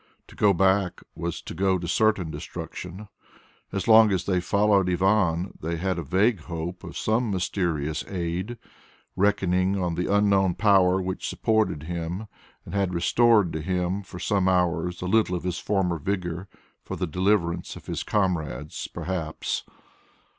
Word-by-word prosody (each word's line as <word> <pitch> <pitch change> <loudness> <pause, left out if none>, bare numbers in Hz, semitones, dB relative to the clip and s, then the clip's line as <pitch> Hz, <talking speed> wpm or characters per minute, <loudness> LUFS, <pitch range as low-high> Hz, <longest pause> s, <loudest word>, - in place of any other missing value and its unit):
To - - -14
go 105 - +4
back 95 0 +2
was 85 0 -4
to - - -7
go 95 +2 +2
to 85 -1 -5
certain 100 -5 +2
destruction. 90 +6 -7 0.6
As 100 - -3
long 110 -1 +7
as 95 -2 0
they 90 -2 +1
followed 100 -1 +3
Ivan, 90 -1 +2
they 85 +2 -2
had 90 +1 -1
a - - -3
vague 100 - +2
hope 85 +2 -6
of - - -7
some 110 +2 +1
mysterious 85 -5 -1
aid, 90 +5 -3 0.6
reckoning 95 -1 +2
on 90 -2 -1
the 90 +3 -1
unknown 100 -3 +3
power 95 -3 +4
which 95 0 -3
supported 110 -9 0
him 85 +4 -4 0.4
and 85 - -9
had 95 -3 0
restored 105 +1 +4
to 80 - -3
him 90 +3 -1
for 95 -2 -11
some 95 0 +1
hours 90 -1 0
a - - -3
little 95 -1 +2
of 90 - -4
his 90 -2 -2
former 90 -5 0
vigour 90 +1 -3 0.3
for - - -6
the 90 - -2
deliverance 90 0 0
of - - -12
his - - -3
comrades 80 - -2
perhaps. 85 -2 -3
90 Hz, 155 wpm, -25 LUFS, 85-100 Hz, 0.6 s, long